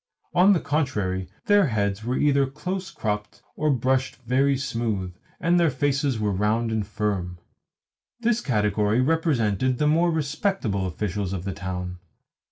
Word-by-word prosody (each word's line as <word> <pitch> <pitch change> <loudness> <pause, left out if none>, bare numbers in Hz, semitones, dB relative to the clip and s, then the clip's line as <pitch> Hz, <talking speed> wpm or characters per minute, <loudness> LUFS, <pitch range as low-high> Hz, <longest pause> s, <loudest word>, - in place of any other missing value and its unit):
On 185 +3 +6
the 180 - +2
contrary, 105 - -1 0.2
their 205 -5 +5
heads 100 -3 -1
were 125 +3 -1
either 140 -2 +3
close 180 +7 -4
cropped 105 -1 -4
or 155 - 0
brushed 130 0 +1
very 135 +3 +2
smooth, 115 -8 -2 0.3
and 175 +2 +3
their 170 -2 +4
faces 135 -1 0
were 105 -1 0
round 110 +4 0
and 110 -3 -1
firm. 100 -4 -2 0.8
This 235 0 +1
category 105 - +1
represented 130 - +1
the 150 - +1
more 165 +3 +3
respectable 150 - -1
officials 100 +2 -3
of 90 -3 -4
the 100 0 -3
town. 90 -1 -5
120 Hz, 145 wpm, -25 LUFS, 100-150 Hz, 0.8 s, On